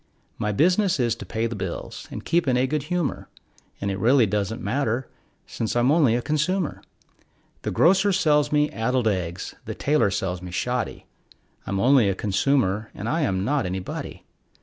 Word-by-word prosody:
My 105 - 0
business 180 - +2
is 120 -2 +2
to - - -9
pay 110 0 -1
the 115 0 -3
bills 95 -3 -6
and - - -7
keep 170 -2 +1
in 125 -1 +3
a 125 - +3
good 150 +3 -1
humor, 180 -5 -2 0.5
And 100 0 -2
it 95 - -3
really 125 +3 +5
doesn't 105 +2 -2
matter, 120 +2 -1 0.4
since 115 0 -3
I'm 120 +3 +3
only 145 -8 +4
a 120 - -1
consumer. 155 +4 -1 0.8
The - - -3
grocer 195 +4 +4
sells 150 -6 +2
me 150 0 +2
addled 120 +1 0
eggs; 90 -3 -2
the - - -5
tailor 145 -7 +2
sells 95 -2 -2
me 90 - -7
shoddy, 125 +7 -2 0.6
I'm 100 - -1
only 125 -2 +5
a 95 - 0
consumer, 105 0 +1
and 105 - -5
I 160 +7 0
am 95 -8 0
not 140 -5 0
anybody. 90 0 -5
120 Hz, 175 wpm, -24 LUFS, 100-150 Hz, 0.8 s, really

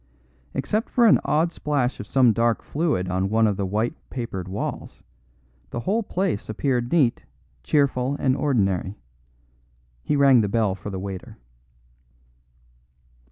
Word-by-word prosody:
Except 215 +2 -1
for 240 - +3
an 220 - +6
odd 165 +3 +1
splash 140 -6 -1
of - - -7
some 125 -4 +4
dark 115 +1 +1
fluid 145 - -1
on 95 +1 -1
one 110 +1 +3
of 105 -2 +1
the 100 -1 -2
white 110 +8 -1 0.2
papered 105 -8 -5
walls, 95 +3 -5 0.7
the 120 - -4
whole 210 - 0
place 185 - -2
appeared 120 +2 -1
neat, 140 -9 +2 0.4
cheerful 135 - +1
and 130 -2 +2
ordinary. 100 -9 0 1.0
He 150 - -1
rang 135 -4 +6
the 105 - -1
bell 110 -2 +1
for 100 +2 -7
the 95 - -5
waiter. 95 -1 -7
120 Hz, 140 wpm, -24 LUFS, 100-145 Hz, 1.0 s, an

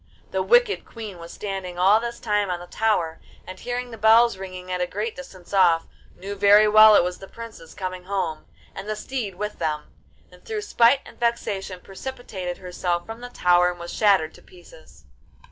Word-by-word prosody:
The - - 0
wicked 485 -3 +3
Queen 215 -6 -9
was 170 0 -10
standing 190 -3 -5
all 195 +4 +5
this 235 0 -5
time 210 -3 0
on 175 -1 -2
the 175 - -9
tower, 175 -6 -1 0.2
and, 185 0 -9
hearing 245 0 -4
the 225 - -9
bells 225 +1 +5
ringing 185 -1 -8
at 180 0 -1
a 180 - 0
great 210 +5 -4
distance 195 -10 -12
off, 175 -4 +4 0.3
knew 195 +2 -6
very 205 +1 +6
well 215 0 +8
it - - +6
was 180 0 -3
the 195 - -10
princes 225 -8 -11
coming 185 -1 -5
home, 185 -5 -3 0.3
and 195 +2 -7
the 215 - -1
steed 215 -3 -4
with 210 +2 -5
them, 150 -1 -3 0.4
and - - -18
through 435 -2 -4
spite 270 - +4
and - - -15
vexation 200 -6 -2
precipitated 195 -5 -6
herself 175 -1 -3
from 225 +1 -8
the 245 - -7
tower 180 -5 +3
and 175 -1 -7
was 170 0 -7
shattered 195 -7 +3
to - - -16
pieces. 165 - -18
195 Hz, 195 wpm, -24 LUFS, 180-225 Hz, 0.4 s, well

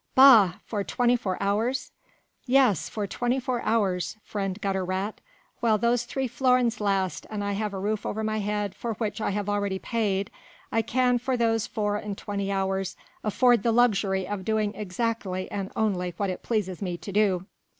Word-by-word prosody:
"Bah! 235 -9 +8
for 205 -3 -2
twenty 240 +7 +2
four 195 -6 -2
hours!..." 225 +6 0 0.6
"Yes! 250 - +3
for 210 -2 -3
twenty 245 +6 -1
four 250 -1 -2
hours, 205 -4 0
friend 195 -1 -3
Gutter 195 -2 -1
rat, 190 +3 -3 0.4
while 225 -2 +3
those 235 +2 +1
three 265 +2 -2
florins 250 -1 +2
last 195 -3 0
and 210 -1 -3
I 200 - -1
have 210 +1 -2
a 195 - -5
roof 210 +2 -1
over 220 +1 -3
my 215 0 -1
head 205 -1 -1
for 230 -2 -4
which 220 0 -3
I - - 0
have 205 0 -2
already 200 -2 0
paid... 200 -3 -1 0.4
I 225 - +2
can 245 +2 +2
for 255 +1 -1
those 225 -2 +1
four 205 -2 -1
and 205 -1 -5
twenty 200 -1 -3
hours 195 -1 -1 0.3
afford 240 +2 +4
the 230 - +2
luxury 200 -5 +2
of 205 -1 -4
doing 215 0 0
exactly 200 -2 -3
and 195 -1 -4
only 180 -5 0
what 200 -2 0
it 180 - -6
pleases 205 -5 -2
me 180 -3 -2
to 200 - -8
do." 190 -3 +2
210 Hz, 180 wpm, -26 LUFS, 195-230 Hz, 0.6 s, Bah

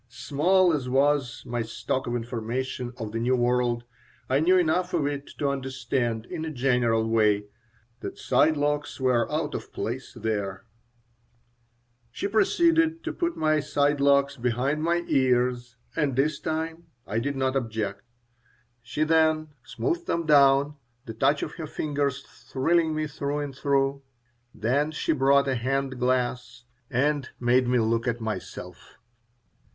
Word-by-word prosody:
Small 180 +5 +2
as 135 -4 -2
was 135 -1 +1
my 120 0 -2
stock 115 +3 -3
of 120 - -1
information 120 +2 -3
of 110 -3 -5
the 115 - -3
New 125 +3 +2
World, 120 -1 +1 0.4
I 130 +2 +2
knew 180 +4 +4
enough 180 +1 +1
of 155 -4 +1
it 145 -1 -3
to 145 - 0
understand, 130 -4 -2
in 160 - -5
a 160 - -3
general 120 -5 +1
way, 105 -2 +2 0.5
that - - -7
side 150 +5 +2
locks 145 0 -1
were 125 -3 +1
out - - -1
of - - -6
place - - -5
there 100 -2 -3 1.4
She 120 +10 -3
proceeded 330 - +2
to 330 - -3
put 340 -1 -2
my 155 -1 +2
side 145 0 +1
locks 140 0 +3
behind 125 +5 0
my 170 +2 +1
ears, 125 -2 +1 0.2
and 145 -5 0
this 140 +2 +1
time 160 +1 -4 0.2
I 110 - -1
did 140 +4 -2
not 130 0 0
object. 110 -5 -2 0.8
She 120 +6 -2
then 155 0 +2
smoothed 345 - -3
them 170 0 -1
down, 140 0 +4 0.3
the 115 - -6
touch 135 +6 +2
of - - -4
her 160 - -5
fingers 145 -2 -2
thrilling 160 +3 0
me 155 0 -1
through 145 -1 -3
and 145 -2 -4
through. 140 0 +1 0.5
Then 130 +8 0
she 155 - -1
brought 140 0 +3
a 135 - +1
hand 130 +1 -1
glass 125 -1 -1 0.3
and 140 +2 0
made 125 +1 +3
me 125 0 +2
look 115 +1 +1
at 120 -1 0
myself. 110 -1 -7
135 Hz, 150 wpm, -26 LUFS, 120-150 Hz, 1.4 s, knew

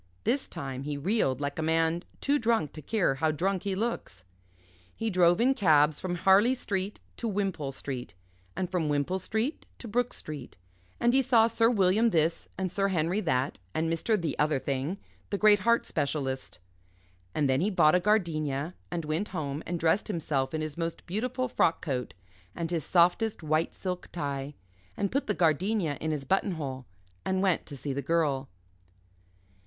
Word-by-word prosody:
This 270 - +1
time 135 -1 -5
he 145 +1 -3
reeled 140 - +1
like 145 +1 -3
a - - +1
man 165 +1 +1 0.2
too 290 +1 +2
drunk 225 - +1
to 155 - -8
care 195 -2 +1
how 155 +4 0
drunk 180 +5 0
he 200 -2 -2
looks. 190 - -3 0.7
He 225 -1 -2
drove 175 -2 +4
in 255 +3 +4
cabs 155 - +4
from 185 -1 -2
Harley 195 +8 +5
Street 200 -4 -3 0.2
to 235 - -3
Wimpole 195 -9 -1
Street, 130 -6 -6 0.4
and 185 - -1
from 175 -4 -1
Wimpole 145 +6 0
Street 220 - -2
to 240 - -9
Brooke 245 +3 0
Street 145 -8 -8 0.4
and 240 +1 +3
he 270 - +5
saw 240 -4 +5
Sir 230 0 +3
William 210 +1 +3
this 165 -3 0
and 185 -2 -2
Sir 195 +1 +1
Henry 180 +2 0
that, 130 - 0 0.2
and 165 +1 +1
Mr. 210 +6 +1
The 165 -5 -2
other 150 -1 +3
thing, 140 +7 -2 0.3
the 200 - -1
great 210 0 +6
heart 235 +4 +3
specialist. 140 -3 -2 0.8
And 150 -2 +2
then 130 +2 +2
he 200 - +2
bought 170 -6 +4
a 180 - +5
gardenia, 165 -6 0 0.2
and 170 -2 -3
went 160 +7 -1
home 150 -4 -4
and 175 0 -2
dressed 165 +5 +2
himself 150 -7 -1
in 155 - -1
his 155 +1 -4
most 165 0 -3
beautiful 250 +7 -2
frock 165 -8 +2
coat 130 -6 -3 0.4
and 165 0 -3
his 165 -3 -1
softest 180 - +2
white 155 +1 0
silk 180 -1 -4
tie, 140 -3 -4 0.4
and 200 -1 -1
put 275 +3 -1
the 210 - 0
gardenia 170 -1 +1
in 160 - -1
his 150 -3 -2
button 190 +5 +1
hole 130 -5 -5 0.4
and 190 0 0
went 185 -3 +1
to 140 - -7
see 140 +1 -3
the 140 - -2
Girl. 140 -3 0
170 Hz, 180 wpm, -29 LUFS, 145-205 Hz, 0.8 s, great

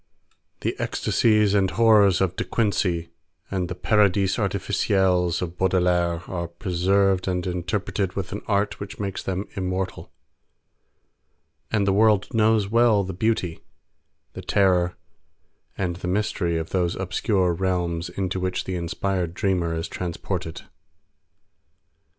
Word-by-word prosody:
The - - -1
ecstasies 105 -3 +2
and 95 -2 +3
horrors 105 -4 +4
of 95 -1 +1
De - - -2
Quincey 90 -6 0 0.4
and 90 -2 -1
the 90 - -4
paradis 100 -1 +2
artificiels 90 -3 +1
of 85 0 -7
Baudelaire 90 -2 +1
are 85 -2 -3
preserved 95 +2 +1
and 90 -1 -1
interpreted 90 +2 -2
with 95 -3 -4
an 100 - -4
art 100 0 0
which 100 - -8
makes 100 -2 -3
them 95 +1 -3
immortal, 95 -1 -3 1.6
and 105 -3 +1
the 100 - +2
world 105 -1 +3
knows 110 -2 +3
well 115 -1 +4
the 95 0 -5
beauty, 95 -4 -1 0.7
the - - -7
terror 90 -3 +2 0.8
and 90 -3 -2
the 90 - -5
mystery 90 -3 0
of 80 0 -4
those 90 -2 0
obscure 95 0 0
realms 85 -2 -1
into 95 0 -3
which 90 0 -2
the 95 - -5
inspired 90 0 -2
dreamer 90 -4 0
is 80 0 -3
transported. 90 -1 -4
95 Hz, 125 wpm, -24 LUFS, 90-100 Hz, 1.6 s, horrors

